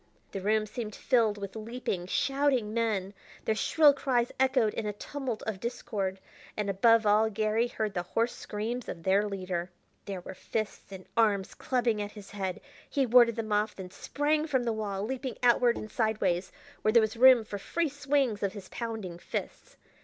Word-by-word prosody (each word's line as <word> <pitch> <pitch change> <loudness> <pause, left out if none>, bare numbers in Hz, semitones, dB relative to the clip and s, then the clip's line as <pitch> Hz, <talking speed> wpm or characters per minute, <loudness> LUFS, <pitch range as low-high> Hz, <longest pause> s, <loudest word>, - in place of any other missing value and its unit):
The 195 - -4
room 215 +2 +2
seemed 215 0 -6
filled 225 -5 +2
with 200 0 -7
leaping, 220 -5 -4
shouting 270 -2 +1
men. 210 -4 0 0.3
Their 220 - +2
shrill 295 +6 +5
cries 250 -4 0
echoed 260 -5 +3
in 215 - -3
a 210 - -2
tumult 255 +1 -5
of 215 -4 -4
discord, 200 -5 -3 0.4
and 205 -1 0
above 225 +3 +4
all 210 +2 +4
Garry 215 +2 +1
heard 215 -3 -3
the 175 - -1
hoarse 230 +7 -1
screams 225 +4 -4
of 165 - -6
their 200 +3 +2
leader. 185 -2 -3 0.4
There 195 -2 -5
were 190 - -8
fists 215 +2 -4
and 190 -1 -9
arms 210 -4 +2
clubbing 240 -4 0
at 205 0 -5
his 205 -2 -11
head. 190 -3 -4 0.3
He 275 -2 +1
warded 240 -1 +6
them 220 -2 -2
off, 210 +1 +1
then 185 -2 -8
sprang 300 +7 0
from 260 -5 +1
the 230 -1 0
wall, 200 -3 -3
leaping 255 +2 -4
outward 240 0 +4
and 215 - -7
sideways, 200 -5 0 0.3
where 215 - +3
there 235 - +7
was 220 0 0
room 250 0 +7
for 205 -1 -5
free 335 - -1
swings 275 -6 0
of 200 -1 -1
his 200 -3 -9
pounding 220 -7 -5
fists. - - -6
220 Hz, 185 wpm, -29 LUFS, 200-245 Hz, 0.4 s, there